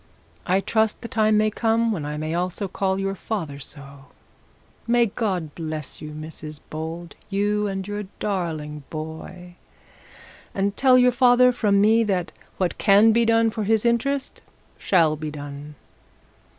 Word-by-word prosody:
I 190 +2 +2
trust 220 +1 0
the - - -4
time 215 -2 +2
may 215 0 +2
come 230 +1 +1
when 160 -8 -3
I 150 0 -4
may 155 +1 -3
also 180 +3 -2
call 190 +1 -1
your 195 0 -1
father 175 -8 -4
so. 140 -1 -11 0.8
My 240 0 +4
God 190 -8 -2
bless 155 -4 -5
you, 150 - -7
Mrs 155 0 -8
Bold, 165 +2 -6 0.2
you 205 +1 0
and 195 -1 -4
your 205 0 -4
darling 160 -7 -3
boy. 170 +3 -8 1.0
And 200 +1 0
tell 260 -2 +5
your 250 0 +5
father 250 0 +5
from 210 -5 +2
me 220 +3 +4
that 185 -4 -1 0.3
what 185 -2 -1
can 210 +2 +6
be 230 +1 +3
done 230 0 +3
for 220 -1 -3
his 220 +2 +1
interest 270 +4 0 0.4
shall 165 -5 +3
be 155 0 -5
done.' 145 0 -8
195 Hz, 150 wpm, -23 LUFS, 155-220 Hz, 1.0 s, can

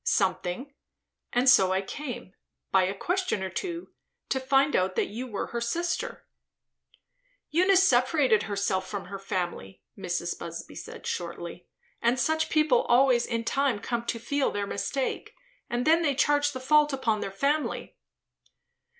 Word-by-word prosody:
"Something; 190 +7 0 0.6
and 245 +2 +1
so 195 -7 +6
I 190 +1 +1
came, 245 -5 -7 0.4
by 190 -1 +4
a 190 +2 -2
question 360 - -1
or 190 - -4
two, 345 - -5 0.4
to 265 - +1
find 270 +2 +3
out 185 0 +1
that - - 0
you 240 +5 -5
were 210 -5 -4
her 235 - -2
sister." 340 +9 -2 1.3
"Eunice 375 +3 +5
separated 255 -2 +3
herself 200 -2 -1
from 200 -2 -5
her 195 +1 -7
family," 175 - -4
Mrs. - - -3
Busby - - -7
said - - -9
shortly; 170 0 -5 0.3
"and 240 +2 +2
such 315 +5 +1
people 305 -6 +3
always 245 -1 +4
in 230 -1 -1
time 270 0 +1
come 235 +3 -3
to 235 - -1
feel 275 +5 0
their 205 0 -2
mistake, 260 +7 -3 0.3
and 240 +1 -1
then 325 +2 +5
they 290 -5 +1
charge 290 +1 +3
the 260 - -5
fault 300 +3 +4
upon 230 -5 0
their - - -3
family." 280 +10 -1
245 Hz, 150 wpm, -27 LUFS, 195-290 Hz, 1.3 s, so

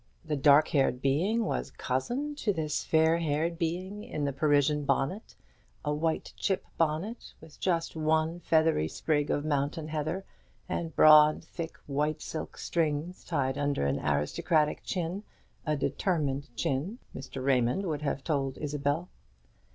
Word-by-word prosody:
The 155 -1 -1
dark 145 +2 +5
haired 135 -3 +2
being 180 - +1
was - - -2
cousin 240 - -2
to 215 - +1
this 155 -5 -2
fair 160 +1 +3
haired 165 +2 -1
being 185 +5 -3
in 145 - -3
the 140 - -1
Parisian 145 0 +2
bonnet, 140 +9 -1 0.5
a 150 - +1
white 160 +2 -1
chip 190 -2 -1
bonnet, 165 +9 -2
with 155 - -15
just 170 -3 0
one 160 +2 +1
feathery 160 - +2
sprig 145 - 0
of 145 - 0
mountain 150 +2 -1
heather, 160 +5 -2 0.4
and 170 -3 -3
broad 155 0 +7
thick 165 0 -7
white 150 +2 -1
silk 160 - -6
strings, 165 +1 -1
tied 135 -5 -1
under 145 - 0
an 70 - 0
aristocratic 150 - +1
chin 180 +2 -2 0.5
a 155 - +2
determined 145 -4 -1
chin, 145 - -1 0.2
Mr. 130 0 -6
Raymond 130 +7 +2
would 155 -4 -2
have 140 -2 -2
told 135 -4 -1
Isabel. 150 +3 -1
155 Hz, 145 wpm, -29 LUFS, 145-165 Hz, 0.5 s, broad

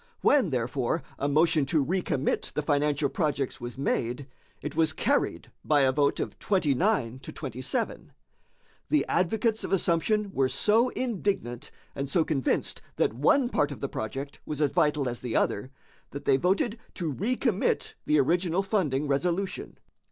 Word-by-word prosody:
When, 270 - +4
therefore, 125 +4 -1 0.2
a 140 - 0
motion 155 +1 +3
to 150 -1 +2
recommit 165 -5 -1
the 150 - -1
financial 145 0 +1
projects 140 -1 -2
was 120 +1 -6
made, 130 -1 -1 0.3
it 150 0 -6
was 160 0 +2
carried - - 0
by 150 -2 +3
a 135 -1 +4
vote 140 +1 +1
of - - -4
29 150 - +1
to - - -9
27. 135 - -3 0.8
The 300 - +3
advocates 220 +5 +1
of - - -4
assumption 195 +3 +1
were 135 -1 +2
so 215 - +3
indignant, 195 - -2 0.2
and 140 0 -4
so 160 +2 +2
convinced 135 -5 0
that - - +1
one 195 - +3
part 145 - +1
of - - -7
the 140 - -2
project 135 +6 -5
was 150 -2 -5
as 145 -3 +2
vital 150 -2 +2
as 120 -1 -3
the 125 -2 -4
other, 105 +6 +1 0.4
that 140 - -8
they 130 - +4
voted 200 - +1 0.2
to 165 -6 -2
recommit 225 - 0
the 150 0 +4
original 175 +5 +2
funding 150 -9 0
resolution. 175 +7 -1
150 Hz, 155 wpm, -27 LUFS, 135-190 Hz, 0.8 s, When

